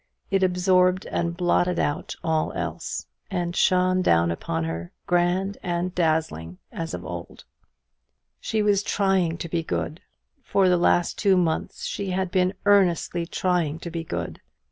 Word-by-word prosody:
It 195 -1 +2
absorbed 185 0 +3
and 170 0 -2
blotted 175 0 +2
out 145 - -1
all 160 -1 +1
else: - - -4 0.2
and 175 -3 -2
shone 185 -1 +3
down 85 - +3
upon 85 0 -2
her, 80 +1 -4
grand 180 +2 +1
and 175 +1 -2
dazzling, 155 - -1
as 165 -1 -4
of 90 - -8
old. 85 0 -7 1.0
She 220 -1 -1
was 205 -1 +3
trying 190 -5 +1
to 170 - -5
be 170 0 -1
good. 160 0 -3 0.4
For 195 -2 +2
the 180 - +4
last 175 0 +2
two 195 -2 +4
months 165 -3 -1
she 200 -1 -3
had 185 0 -1
been 185 0 +2
earnestly 175 -4 +3
trying 175 -4 0
to 170 - -6
be 165 0 -3
good. - - -5
175 Hz, 150 wpm, -25 LUFS, 160-185 Hz, 1.0 s, the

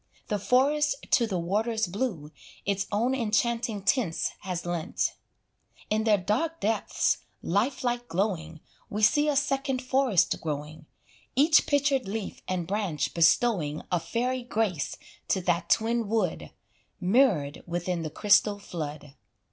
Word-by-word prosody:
The 210 - 0
forest 280 +6 +2 0.2
to 235 - +4
the 190 -4 -2
waters 220 +6 0
blue 180 - -3 0.3
Its 200 -1 -1
own 230 +5 +1
enchanting 230 -3 0
tints 195 -7 +1
has 180 -3 -4
lent; 175 -2 -1 0.8
In 215 +1 +1
their 215 -2 +5
dark 250 - -1
depths, 220 +2 0 0.2
lifelike 240 +4 0
glowing, 165 -5 -2 0.3
We 210 +1 -3
see 295 +7 +4
a 295 - +1
second 275 -1 0
forest 255 -6 +2
growing, 155 0 -5 0.5
Each 305 +4 +5
pictured 280 -5 +2
leaf 210 +1 -5
and 180 -2 -2
branch 190 -5 -2
bestowing 170 -3 +2
A 175 - +2
fairy 245 +10 -2
grace 215 - -1 0.3
to 190 - +1
that 175 -1 0
twin 230 0 +2
wood, 225 +1 -1 0.5
Mirrored 190 - +2
within 175 0 -2
the 155 - -3
crystal 205 +3 +3
flood. 150 -7 -7
210 Hz, 130 wpm, -27 LUFS, 175-245 Hz, 0.8 s, their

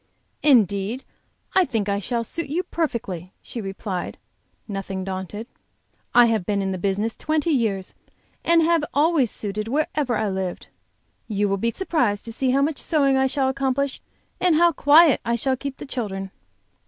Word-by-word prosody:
"Indeed, 220 - +3 0.5
I 380 - +5
think 225 - -2
I 200 0 0
shall 235 +3 -2
suit 310 +7 -5
you 340 +5 -1
perfectly," 220 - -3
she 235 - -7
replied, 195 -2 -4 0.5
nothing 195 -2 -4
daunted. 190 +3 -5 0.7
"I 245 0 +8
have 225 -4 +1
been 200 +2 -1
in 195 -1 -1
the 185 - -3
business 205 +4 -1
twenty 310 +1 0
years, 215 -9 0 0.5
and 335 0 +4
have 335 -1 +3
always 295 -4 +3
suited 210 +1 -4
wherever 285 -1 0
I 215 - 0
lived. 190 -2 -4 0.6
You 205 -1 0
will 195 0 0
be 230 +4 0
surprised 245 - 0
to 230 - -5
see 260 +3 0
how 275 +2 +3
much 300 0 -1
sewing 280 -4 +2
I 265 0 +3
shall 270 0 0
accomplish, 270 +1 -1 0.4
and 360 -3 +3
how 340 +2 +5
quiet 300 0 +6
I 235 +1 0
shall 260 +3 0
keep 275 +1 -6
the - - -8
children." 195 -8 -4
235 Hz, 165 wpm, -23 LUFS, 200-285 Hz, 0.7 s, I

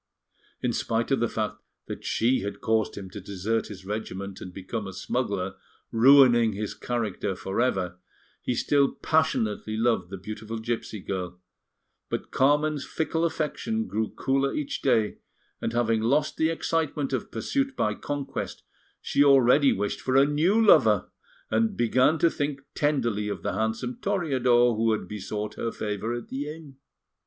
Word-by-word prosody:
In 125 -2 +1
spite 115 +3 -1
of 135 - +3
the 120 - +2
fact 110 -1 -2 0.3
that - - -7
she 125 +3 +2
had 100 +1 -5
caused 110 -1 0
him 100 -2 -6
to 100 - -7
desert 100 +4 -2
his 95 -3 -10
regiment 100 -2 -5
and 90 - -7
become 100 +3 -5
a 95 - -7
smuggler, 100 -2 -2 0.3
ruining 120 -2 +6
his 105 +1 -4
character 110 -5 -2
for 95 +4 -2
ever, 95 -7 0 0.4
he 125 - -1
still 140 +3 +2
passionately 110 -9 0
loved 115 -5 +1
the 95 - -6
beautiful 110 +3 -6
gipsy 110 -2 -4
girl; 90 -2 -4 0.7
but - - -4
Carmen's 145 +2 +2
fickle 160 0 -2
affection 170 +8 -2
grew 110 - -2
cooler 135 +1 0
each 145 -2 -3
day, 115 -6 +2 0.4
and - - -1
having 115 -2 +1
lost 140 +7 +1
the 160 - +2
excitement 155 -4 -1
of 130 - -2
pursuit 270 - -1
by - - +1
conquest, 145 -1 -5 0.4
she 140 - +3
already 140 0 +6
wished 100 +1 -2
for 130 - -1
a 135 +1 +7
new 160 +9 +2
lover, 225 - +5 0.4
and 225 -3 +1
began 130 +6 +3
to 165 +1 +3
think 145 -1 -3
tenderly 120 -8 0
of 100 -5 -4
the - - -1
handsome 110 +4 -2
Toreador 130 - +2
who 110 0 +2
had 110 - -3
besought 105 0 -4
her 115 - -2
favour 105 +1 -3
at 120 - -7
the 145 +3 -4
inn. 150 -4 -12
120 Hz, 160 wpm, -26 LUFS, 105-140 Hz, 0.7 s, a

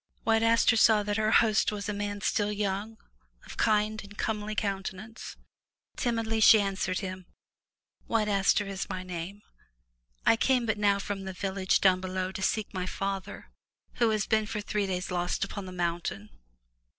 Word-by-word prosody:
'' - - -40
White 225 0 +3
Aster 230 +1 +4
saw 220 -2 +5
that 205 +1 -1
her 215 0 +1
host 220 -1 +4
was 205 0 -5
a 210 - -2
man 205 0 -4
still 205 +1 0
young, 205 +1 -3 0.5
of - - -10
kind 215 0 +1
and 205 +1 -13
comely 215 -1 -2
countenance. 200 +2 -4 0.6
Timidly 225 -2 -1
she 220 0 +8
answered 195 -2 -1
him: 185 -2 -6 0.8
"White 220 -2 +1
Aster 200 0 +2
is 195 0 -5
my 185 -1 -4
name. 180 +3 -7 0.8
I 225 - +5
came 250 0 +2
but 220 -2 -1
now 200 -1 +3
from 200 -1 -5
the 190 - -5
village 190 0 0
down 185 -1 +4
below 185 0 -3
to 190 - -6
seek 210 +2 -1
my 185 -1 -3
father, 195 0 -5 0.5
who 235 -2 +3
has 215 -2 0
been 220 -1 +1
for 210 - -3
three 210 -1 -1
days 180 0 -3
lost 175 +1 -1
upon 195 -1 -5
the - - -7
mountain." 170 - -3
205 Hz, 175 wpm, -28 LUFS, 190-215 Hz, 0.8 s, she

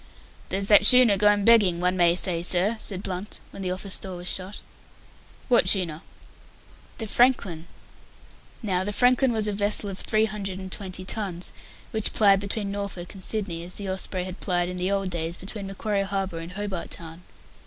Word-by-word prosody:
"There's 195 +1 -1
that 205 0 +6
schooner 245 -1 +8
going 205 0 +3
begging, 205 -7 +5
one 180 +1 +1
may 175 -1 +4
say, 175 -2 +2
sir," 185 +5 +2
said 190 -3 -3
Blunt, 185 +3 -6
when 195 - -9
the 185 - -2
office 190 +1 -2
door 190 -2 -6
was 175 0 -6
shut. 190 +3 -3 0.9
"What 245 - +4
schooner?" 170 -5 +1 1.0
"The 225 - -4
Franklin." 200 -8 +1 1.0
Now 185 -3 0
the 205 +2 -4
Franklin 250 +3 +3
was 220 -2 0
a 210 - -1
vessel 205 0 +1
of 190 - -8
three 215 0 +1
hundred 195 -3 -5
and 190 -1 -8
twenty 185 -1 -6
tons 185 -4 -3 0.4
which 220 -1 0
plied 200 -2 +4
between 200 0 -3
Norfolk 200 -3 -5
Island - - -12
and 190 -2 -12
Sydney, 185 -7 -3
as 180 +1 -9
the 200 -2 -4
Osprey 190 -1 -3
had 185 0 -8
plied 175 -1 -1
in 180 - -6
the 180 +1 -1
old 195 -2 -1
days 170 0 -2
between 195 +1 -5
Macquarie 200 +1 -2
Harbour 195 -3 -3
and 165 +2 -8
Hobart 200 -3 -5
Town. 165 0 -8
195 Hz, 185 wpm, -25 LUFS, 180-205 Hz, 1.0 s, schooner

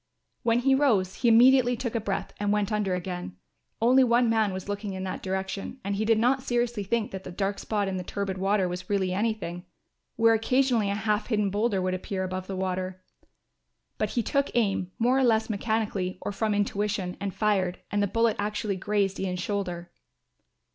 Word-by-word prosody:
When 230 0 +2
he 270 +2 +3
rose 220 -10 +2
he 245 - +1
immediately 245 +1 +6
took 240 -2 -3
a 230 - -1
breath 200 -2 -3
and 205 0 0
went 210 0 +1
under 205 -3 0
again. 180 - -5 0.4
Only 255 +3 +5
one 240 -1 +3
man 220 -3 +2
was 185 0 -6
looking 205 0 -4
in 190 0 -5
that 190 - -4
direction 190 +5 -4
and 200 +1 -2
he 215 +2 -1
did 225 0 +4
not 250 +4 +2
seriously 240 -3 -1
think 220 +2 -1
that 190 -1 -6
the - - -7
dark 195 +2 -2
spot 205 -2 -1
in 190 -1 -2
the 180 - -4
turbid 195 0 -3
river 195 0 +2
was 180 +4 -6
really 190 -3 +1
anything; 195 -4 -2 0.5
where 225 0 +5
occasionally 235 -1 +2
a 200 - 0
half 215 +1 0
hidden 210 -4 +1
boulder 205 -2 0
would 185 0 0
appear 190 +1 -3
above 185 0 -4
the 195 - -4
water. 185 0 -3 1.0
But - - 0
he 235 - +3
took 280 +5 0
aim, 195 -5 +1
more 250 +3 +3
or - - +3
less 225 -2 +2
mechanically 210 -3 -1
or - - -3
from 210 +1 0
intuition, 205 -2 -1
and 200 0 -3
fired, 190 -4 0
and 205 - +1
the 205 - +2
bullet 230 +2 +1
actually 210 -1 -2
grazed 200 0 0
Ian's 185 -1 -2
shoulder. 180 -4 -3
205 Hz, 195 wpm, -27 LUFS, 190-225 Hz, 1.0 s, immediately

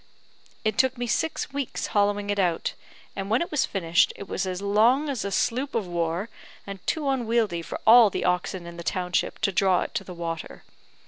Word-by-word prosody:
It 215 -1 0
took 260 -1 +3
me 245 - -2
six 275 +4 -1
weeks 280 -2 -3
hollowing 205 0 +1
it 205 - -1
out, 175 -3 0 0.4
and 195 0 -4
when 230 +8 +2
it - - -9
was 300 - +1
finished, 170 -4 +2
it 200 - -9
was 190 - -2
as 180 -1 -3
long 220 +9 +3
as 260 -8 -2
a 200 - -2
sloop 260 +7 0
of 225 -4 0
war, 170 +2 -2 0.4
and 195 -1 -7
too 305 -3 0
unwieldy 230 -8 +1
for - - -6
all 230 -1 +8
the - - -3
oxen 180 0 -1
in 170 0 -9
the 170 - -7
township 180 0 -1
to 200 - +2
draw 190 -1 +3
it - - -5
to - - -2
the 180 - -9
water. 165 -1 -5
200 Hz, 205 wpm, -25 LUFS, 180-235 Hz, 0.4 s, all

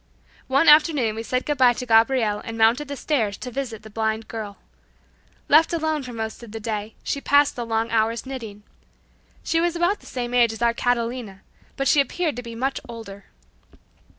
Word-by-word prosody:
One 275 +4 +2
afternoon 295 -7 +5
we 220 - -5
said 255 +3 -2
good 295 -2 -2
bye 250 -2 +6
to 250 - -6
Gabriel 225 -2 +3
and 225 0 -6
mounted 230 +6 +3
the 280 - -5
stairs 225 -11 -1
to 250 - -7
visit 230 -5 -5
the 220 - -11
blind 220 0 -2
girl. 210 -3 -6 0.9
Left 320 +3 +5
alone 315 -2 0
for 250 -2 -8
most 220 -1 -5
of 235 -3 -11
the 225 - -6
day, 215 0 -4
she 280 - -3
passed 285 +1 +3
the 240 -1 -5
long 225 0 -1
hours 225 +1 0
knitting. 225 -6 -8 0.8
She 330 - +1
was 345 0 0
about 350 +4 +1
the - - -17
same 245 -1 -4
age 235 -2 +4
as 225 - -10
our 235 0 +3
Catalina, 235 -4 -2 0.3
but 275 - 0
she 290 - +5
appeared 315 +3 -2
to - - -3
be 235 -1 -9
much 265 +3 -2
older. 200 -4 -9
235 Hz, 195 wpm, -23 LUFS, 225-275 Hz, 0.9 s, bye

